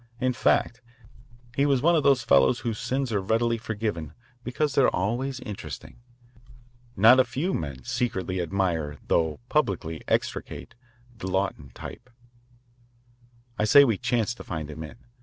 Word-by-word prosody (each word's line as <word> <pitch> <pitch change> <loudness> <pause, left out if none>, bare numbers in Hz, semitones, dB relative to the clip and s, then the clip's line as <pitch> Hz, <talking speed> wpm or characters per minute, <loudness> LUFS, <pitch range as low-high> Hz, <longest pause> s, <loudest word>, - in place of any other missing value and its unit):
In 130 0 +1
fact, 120 0 +1 0.7
he 140 +1 +2
was 135 -2 +2
one 170 +2 +5
of 155 - +3
those 140 -4 +3
fellows 70 - +4
whose 115 -3 -3
sins 130 -1 -2
are 100 -2 0
readily 115 +3 +1
forgiven 105 -9 -4 0.3
because 135 +4 -1
they 140 - +4
are 125 - +5
always 125 +7 -2
interesting. 105 +2 -8 1.0
Not 115 +6 +7
a - - +7
few 135 +9 -2
men 70 -5 -4
secretly 95 - -2
admire 85 -5 -1
though 80 -2 +1
publicly 90 - -1
execrate - - -2 0.4
the 110 -4 -6
Lawton 95 -7 -2
type. - - -9 1.5
I 105 - +2
say 140 +6 +8
we 110 -7 0
chanced 120 0 0
to - - -9
find 80 -2 -5
him 75 - -8
in. 75 - -8
110 Hz, 150 wpm, -26 LUFS, 85-130 Hz, 1.5 s, say